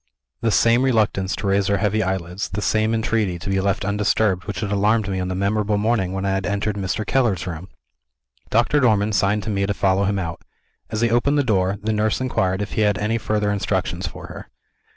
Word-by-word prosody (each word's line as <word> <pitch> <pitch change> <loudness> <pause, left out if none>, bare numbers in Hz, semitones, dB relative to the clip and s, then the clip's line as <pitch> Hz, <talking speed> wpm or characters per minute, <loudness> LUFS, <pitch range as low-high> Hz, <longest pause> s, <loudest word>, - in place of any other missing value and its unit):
The 115 - +1
same 115 +3 +4
reluctance 110 -7 +1
to - - -6
raise 100 0 +2
her 100 - +2
heavy 105 +2 +1
eyelids, 95 0 -3
the 105 - -4
same 110 +1 +1
entreaty 110 -5 0
to 95 +4 -7
be 95 0 +1
left 100 +1 0
undisturbed, 100 -1 +1
which 105 - -4
had 105 -2 -3
alarmed 105 +1 +2
me 95 -1 -2
on 90 - -2
the 95 - -3
memorable 105 +2 0
morning 105 -3 0
when 95 0 -3
I 100 - +1
had 95 0 -1
entered 100 +1 -1
Mr. 100 +2 -2
Keller's 115 -10 +1
room! 90 0 -6 0.8
Doctor 120 +6 +3
Dormann 110 -5 +2
signed 100 +2 +1
to 110 - -3
me 100 -1 0
to 100 - -1
follow 95 0 +2
him 100 +1 0
out. 85 -3 -4 0.5
As 110 0 -2
he 120 -1 +2
opened 140 +5 +2
the 145 - +3
door, 100 -5 +1
the 110 +1 0
nurse 105 0 0
inquired 95 -6 0
if 105 - -7
he - - -1
had 105 -1 +2
any 110 +2 -1
further 105 -1 0
instructions 95 -3 -1
for - - -9
her. - - -10
100 Hz, 220 wpm, -22 LUFS, 95-110 Hz, 0.8 s, same